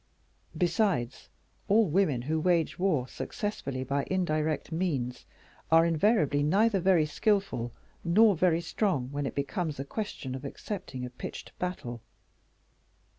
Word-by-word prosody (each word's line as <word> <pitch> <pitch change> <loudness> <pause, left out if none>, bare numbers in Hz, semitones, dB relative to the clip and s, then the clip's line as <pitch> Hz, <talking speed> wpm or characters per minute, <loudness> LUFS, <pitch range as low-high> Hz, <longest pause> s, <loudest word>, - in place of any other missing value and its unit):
Besides, 170 - 0 0.4
all 220 +2 +5
women 155 -7 +1
who 155 +4 0
wage 170 -1 +1
war 160 -10 +1
successfully 140 - -4
by 140 +2 -1
indirect 155 -5 0
means, 150 -8 -2 0.4
are 165 +1 +7
invariably 160 - +2
neither 195 +7 +3
very 180 -3 +4
skillful 175 - 0 0.3
nor 200 +4 +5
very 170 0 +2
strong 165 - -1
when 145 -1 -2
it - - -6
becomes 150 +1 -2
a 135 - -3
question 145 - -5
of 130 +1 -6
accepting 140 -3 -5
a 125 - -7
pitched 125 - -8
battle. 125 -10 -4
160 Hz, 125 wpm, -29 LUFS, 140-190 Hz, 0.4 s, are